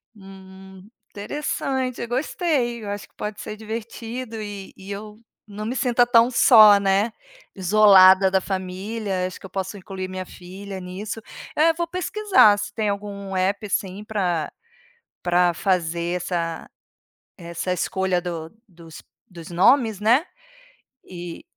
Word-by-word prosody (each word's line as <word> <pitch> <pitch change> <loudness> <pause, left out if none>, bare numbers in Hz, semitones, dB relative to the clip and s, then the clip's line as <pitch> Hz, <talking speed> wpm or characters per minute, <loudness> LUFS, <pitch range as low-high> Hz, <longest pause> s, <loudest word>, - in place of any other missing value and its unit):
Hum, 190 -1 -14 0.2
interessante, 260 +2 -3
eu 235 - -4
gostei, 250 - -1
eu 205 - -6
acho 205 0 -5
que - - -39
pode 210 0 -5
ser 215 - -7
divertido 225 +1 -6
e 205 -2 -8
e 190 +1 -12
eu 210 +1 -8 0.3
não 210 +1 -7
me 240 +4 -3
sinta 245 -2 +2
tão 240 0 +5
só, 215 -4 +7
né, 200 +3 +1 0.4
isolada 190 -1 +6
da 190 - +3
família, 190 +1 -3
acho 185 - -9
que - - -13
eu - - -9
posso 190 +2 -4
incluir 190 0 -6
minha 185 0 -6
filha 190 +2 -9
nisso. 190 +4 -6 0.4
É, 325 +2 +4
vou 340 +1 -2
pesquisar 365 - +3
se 205 0 -5
tem 215 0 -1
algum 200 -1 -5
APP, 195 +3 0
assim 195 0 -3
pra 180 -7 -1 0.7
pra 175 0 +3
fazer 170 -1 -1
essa 170 -2 -4 0.7
essa 170 +1 -4
escolha 185 0 0
do 165 -2 -6 0.2
dos 165 -4 -13 0.3
dos 170 -3 -11
nomes, 220 +4 +3
né. 235 +8 +4 0.8
E, 175 -2 -9
200 Hz, 140 wpm, -23 LUFS, 185-220 Hz, 0.8 s, só